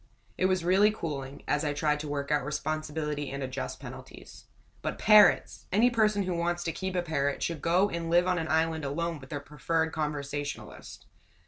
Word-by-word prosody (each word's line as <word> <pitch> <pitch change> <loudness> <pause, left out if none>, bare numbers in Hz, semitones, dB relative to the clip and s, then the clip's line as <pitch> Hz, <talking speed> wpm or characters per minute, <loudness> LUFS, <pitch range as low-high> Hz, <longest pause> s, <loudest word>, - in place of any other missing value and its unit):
It 185 - +2
was 185 -2 0
really 195 +4 +5
cooling, 140 -9 -5
as 145 +1 +1
I 145 -1 0
tried 150 0 +1
to 150 - -5
work 145 0 -3
out 150 -3 +2
responsibility 150 0 -3
and 140 0 -4
adjust 130 - -4
penalties. - - -11 0.4
But - - -3
parrots! 215 -1 +5
Any 225 +6 +4
person 215 -3 +2
who 185 -1 -2
wants 175 +1 -1
to 165 - -1
keep 190 +3 -4
a 180 - +1
parrot 140 -4 -1
should 165 -4 -2
go 180 +4 +3
and 170 -3 -4
live 175 +1 +4
on 180 -1 +1
an 160 - -3
island 160 0 +1
alone 165 +3 -2
with 130 -1 -13
their 145 - -3
preferred 160 +3 -1
conversationalist! 145 -1 -5
160 Hz, 190 wpm, -29 LUFS, 145-175 Hz, 0.4 s, really